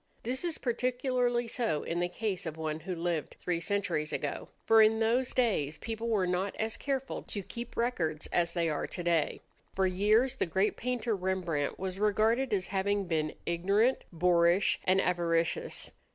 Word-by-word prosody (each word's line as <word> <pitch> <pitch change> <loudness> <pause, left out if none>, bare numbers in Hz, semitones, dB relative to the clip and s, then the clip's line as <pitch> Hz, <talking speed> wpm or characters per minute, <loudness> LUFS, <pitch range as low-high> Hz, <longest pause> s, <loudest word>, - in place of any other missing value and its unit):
This 255 +6 -2
is 340 -2 -1
particularly 245 0 0
so 225 -10 -1
in 170 - -2
the 175 0 0
case 195 -1 -3
of 160 0 -5
one 155 -1 -3
who 185 +2 -4
lived 170 -2 -2
three 175 -2 -1
centuries 170 -5 -1
ago; - - -3 0.2
for 225 0 +7
in 220 +1 +5
those 240 +3 +2
days 160 - +1
people 225 0 -4
were 205 -5 +2
not 180 +2 -1
as 220 0 -2
careful 270 -1 -3
to 200 - -6
keep 235 +5 -8
records 170 -11 -1
as 170 0 +1
they 170 -1 +1
are 150 -2 -1
today. 170 -3 0 0.3
For 190 - +2
years 215 +8 +3
the - - 0
great 190 +5 +1
painter 240 -2 -1
Rembrandt 180 -6 -1
was 190 0 -4
regarded 220 +5 +2
as 190 -3 +1
having 200 +1 0
been 155 -3 -1
ignorant, 200 +9 +2
boorish, 175 +2 +3
and 185 +1 +4
avaricious. 170 -3 0
190 Hz, 165 wpm, -31 LUFS, 170-230 Hz, 0.3 s, for